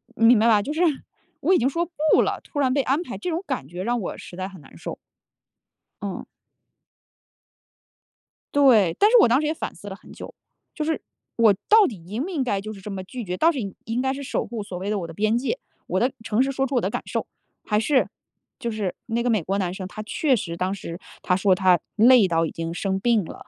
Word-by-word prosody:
你 225 - +2
明 235 -2 +7
白 225 - +4
吧， 215 -3 +5
就 280 +8 -4
是 320 - -1 0.6
我 375 - +3
已 - - +6
经 255 - +2
说 335 +5 -1 0.3
不 - - +6
了， - - -1
突 290 - -5
然 260 -2 +2
被 280 - +2
安 270 +4 +1
排， - - -7
这 360 - -4
种 340 +2 -2
感 135 - -3
觉 175 +4 -6
让 240 +3 0
我 185 - -5
实 - - -10
在 185 +1 -4
很 190 -2 -13
难 135 - -17
受。 - - -6 1.0
嗯。 200 -1 -5 2.3
对， 235 -12 +5
但 415 - +6
是 - - +7
我 - - +6
当 250 +5 +3
时 305 - -1
也 310 - +1
反 - - -5
思 200 - -12
了 190 - -6
很 - - -16
久。 - - -9 0.4
就 310 - -3
是 320 +1 -1 0.4
我 225 -3 +6 0.2
到 430 -2 +7
底 230 - -5
应 215 +8 -3
不 360 - -5
应 315 -8 -1
该 205 -6 0
就 215 +2 -6
是 195 - -12
这 210 - -7
么 190 -1 -5
拒 240 +6 -7
绝， 180 -2 -4
到 330 - +4
底 230 - -5
应 230 +3 -1
该 265 0 0
是 280 +1 -6
守 - - -2
护 230 -3 -5
所 185 -3 -7
谓 190 +3 -4
的 210 -1 0
我 170 - -5
的 165 - -9
边 215 +6 +1
界， 270 - -1 0.3
我 185 - 0
的 250 +5 +2
诚 225 +2 +1
实 270 - -1
说 270 0 0
出 270 - -3
我 245 - +3
的 - - 0
感 - - -3
受， - - -3 0.4
还 210 -1 +1
是 260 +4 +2 0.5
就 235 - -3
是 210 -4 -2
那 235 +1 -1
个 245 - +1
美 220 -4 +2
国 195 +4 -1
男 180 -3 -1
生， 190 -1 -6
他 215 +2 -7
确 265 +5 +1
实 170 -6 -4
当 185 +2 -1
时 175 -3 -7 0.2
他 180 - +2
说 190 0 +3
他 180 -2 +4 0.2
累 235 -1 +6
到 165 -1 +1
已 - - -4
经 165 0 -4
生 190 +2 -1
病 225 0 +2
了， 160 - -11
220 Hz, 270 characters per minute, -24 LUFS, 190-265 Hz, 2.3 s, 明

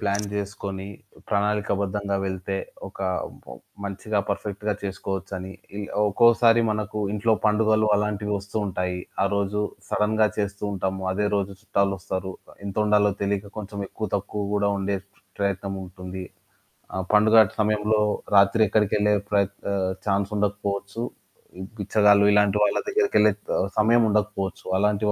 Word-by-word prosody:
Plan 100 0 0
జేసుకొని 100 -1 -4 0.4
ప్రణాళికాబద్ధంగా 100 -1 0
వెళ్తే 95 +1 -3 0.3
ఒక - - -16 0.9
మంచిగా, 100 +2 -2
పర్ఫెక్ట్‌గా 100 +1 -2
చేసుకోవచ్చని. 95 -1 -4 0.3
ఇలా 100 - -5 0.2
ఒక్కోసారి 115 +1 +5
మనకు 105 0 -2
ఇంట్లో 110 +2 +2
పండుగలు 110 0 +3
అలాంటివి 105 0 -1
వస్తూ 100 +2 -8
ఉంటాయి. 90 -1 -2 0.2
ఆ - - +3
రోజు 100 +1 0 0.3
సడెన్‌గా 110 +1 +2
చేస్తూ 100 0 -2
ఉంటాము. 95 0 -2
అదే 105 +2 0
రోజు 100 0 -1
చుట్టాలొస్తారు. 95 -2 -1 0.3
ఎంత 100 - -6
వండాలో 105 -1 +4
తెలియక 100 0 -2
కొంచెం 100 0 -6
ఎక్కువ 110 - -4
తక్కువ 100 +1 -4
గూడా 100 0 +2
వండే 100 0 -1 0.4
ప్రయత్నముంటుంది. 95 -1 -4 0.7
ఆ! - - -3 0.2
పండుగ 105 +1 +5 0.2
సమయంలో 105 0 +2 0.4
రాత్రి 100 +3 +4
ఎక్కడికెళ్ళే 105 0 +2 0.2
ప్రయత్ 100 -1 +2 0.2
ఆ! - - 0 0.3
ఛాన్స్ 100 0 +1
ఉండకపోవచ్చు. 100 +1 -2 0.6
ఈ - - -7 0.2
బిచ్చగాళ్లుు 105 0 +4
ఇలాంటి 105 0 +4
వాళ్ళ 105 - +3
దగ్గరికెళ్ళే 405 - +3 0.5
సమయం 115 +2 +5
ఉండకపోవచ్చు. 105 -2 -1
అలాంటి 105 +1 +1
100 Hz, 120 wpm, -25 LUFS, 100-105 Hz, 0.9 s, ఒక్కోసారి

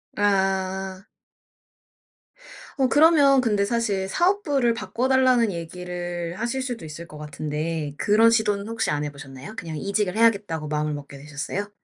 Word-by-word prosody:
아. 190 -1 0 1.7
어 265 - +4
그러면 290 -3 +6
근데 210 -5 +1
사실 205 -4 -1
사업부를 290 - +2
바꿔 240 +2 -2
달라는 255 -4 +4
얘기를 175 0 -5
하실 240 +3 -1
수도 245 -8 -5
있을 165 +2 -8
것 150 - -11
같은데 150 0 -4
그런 220 +5 +5
시도는 210 -2 +1
혹시 230 -6 -1
안 150 0 -1
해보셨나요? 140 +5 -8
그냥 160 -7 -5
이직을 200 +1 -1
해야겠다고 200 -9 +2
마음을 150 0 -1
먹게 140 -1 -8
되셨어요? 150 +8 -5
195 Hz, 320 characters per minute, -24 LUFS, 160-230 Hz, 1.7 s, 그러면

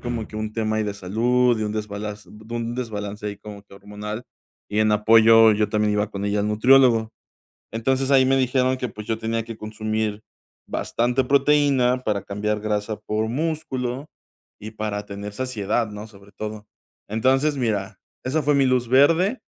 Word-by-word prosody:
como 120 -3 -4
que 110 - -9
un 110 0 -4
tema 110 -1 -1
de 105 -1 -2
salud 120 +5 +1
y - - 0
un 105 - -3
desbalance 105 -1 -5
de 110 +2 -10
un 120 0 -3
desbalance 105 -4 -5
ahí 100 -1 -4
como 105 -1 -10
que 100 - -24
hormonal, 105 +3 -7 0.4
y 105 +1 -2
en 110 0 +3
apoyo 115 +1 +6
yo 105 0 +1
también 105 -1 +1
iba 105 +1 0
con 100 0 -5
ella 100 0 0
al 105 - -1
nutriólogo, 115 0 +4 0.6
entonces 130 +4 0
ahí 130 -1 +6
me 135 +1 +3
dijeron 130 0 +1
que, 125 -1 -3
pues, 105 0 -9
yo 110 -1 -1
tenía 115 0 -2
que 115 -2 -8
consumir 110 0 -3 0.4
bastante 125 +3 0
proteína 140 -2 +3
para 105 -2 -1
cambiar 105 +1 -2
grasa 105 0 -2
por 110 +1 -2
músculo 135 -2 -3 0.5
y 110 +1 -8
para 105 -1 -4
tener 100 0 -7
saciedad, 115 -2 -1
¿no?, 105 +1 -8
sobre 100 -1 -17
todo. 105 0 -6 0.4
Entonces, 135 +6 +2
mira, 105 -6 -2 0.2
esa 145 +5 0
fue 145 0 +3
mi 135 -1 +3
luz 125 -2 +1
verde. 165 - +4
110 Hz, 175 wpm, -23 LUFS, 105-125 Hz, 0.6 s, apoyo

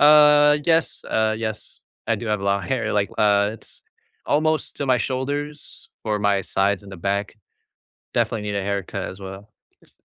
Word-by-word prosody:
Uh, 150 0 +7
yes 165 0 +1
uh 110 0 +1
yes. 110 -2 -6 0.3
I - - +3
do 120 - -6
have 105 -2 0
a - - -5
lot 100 0 +1
of - - -9
hair, 120 -5 0
like, 100 -1 +1
uh, 100 -1 +4
it's - - -14 0.4
almost 155 +2 +1
to 140 - -2
my 130 -1 +4
shoulders 145 +4 -4
or 105 -1 0
my 100 -1 +2
sides 100 +1 0
and 100 - -12
the 95 - -8
back, 100 +4 -2 0.8
definitely 110 -2 0
need 105 -1 -3
a 100 - -1
haircut 100 -1 -3
as 95 - -9
well. 95 +2 -9 0.3
Is - - -25
105 Hz, 185 wpm, -23 LUFS, 100-145 Hz, 0.8 s, Uh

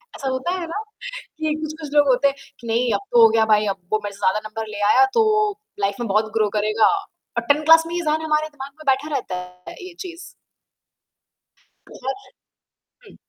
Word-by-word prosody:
ऐसा 275 - -5
होता 260 +6 -1
है 340 - -5
न, - - -9 0.7
कि 310 -1 +1
कुछ-कुछ 310 0 -6
लोग 290 -1 +5
होते 265 +2 +4
हैं, 275 - -1 0.2
कि 235 - -10
नहीं 235 +2 +1
अब 200 - +1
तो 240 - +6
हो 225 - +8
गया 220 0 +3
भाई, 210 0 +3
अब 195 -1 -1 0.2
वो 215 - +3
मेरे 205 - -5
से 200 - -17
ज़्यादा 200 +1 +2
नंबर 220 0 -5
ले 210 -1 -6
आया, 400 - +6
तो 430 -2 +3 0.3
लाइफ 200 0 0
में 240 - -2
बहुत 215 +2 +1
ग्रो 215 -1 +2
करेगा 215 +1 +2 0.5
और - - +2
10 300 +2 +1
क्लास 325 +1 +7
में 335 - -6
ही 350 - -1
ये 345 - -5
ज़हन 310 +1 +1
हमारे 305 0 +1
दिमाग 280 -2 -9
में 310 - -12
बैठा 280 +4 -5
रहता 240 -8 -3
है, 180 0 -9
ये 365 - -10
चीज़। 345 -2 -7 1.7
पहुँच। 270 +10 -6 0.8
हुँ। - - -16
265 Hz, 210 wpm, -22 LUFS, 215-315 Hz, 1.7 s, हो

